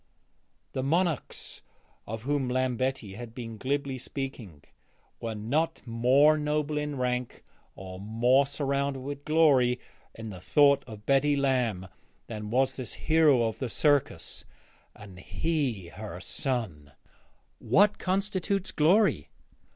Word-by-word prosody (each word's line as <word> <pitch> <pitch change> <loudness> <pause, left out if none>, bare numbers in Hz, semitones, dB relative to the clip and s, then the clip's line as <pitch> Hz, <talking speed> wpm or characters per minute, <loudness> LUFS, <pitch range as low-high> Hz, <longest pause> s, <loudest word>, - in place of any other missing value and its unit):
The 130 - -2
monarchs 165 +2 -1 0.5
of 110 +1 -5
whom 140 -1 0
Lambetti 130 -4 -1
had 115 +1 -9
been 115 -3 -7
glibly 140 0 -2
speaking 120 - -6 0.6
were 115 -1 -4
not 135 +10 -1
more 130 +6 +4
noble 150 0 -1
in 150 -1 -3
rank 125 -1 -2 0.3
or 95 -1 -9
more 120 +7 +3
surrounded 140 -1 -1
with 140 +1 -6
glory 140 -6 +4 0.4
in 110 -1 -7
the 90 -2 -9
thought 140 +6 +4
of 105 -3 -10
Betty 140 +1 +3
Lamb 125 -9 0 0.4
than 105 -2 -6
was 130 +3 +1
this 130 -4 -3
hero 155 -6 +3
of 110 -1 -2
the 130 - -3
circus, 145 +2 0 0.5
and 95 -3 -12
he 110 - -2
her 90 0 -8
son! 95 - -3 0.7
What 205 +1 +3
constitutes 195 0 -1
glory? 185 +9 +3
130 Hz, 120 wpm, -28 LUFS, 115-145 Hz, 0.7 s, more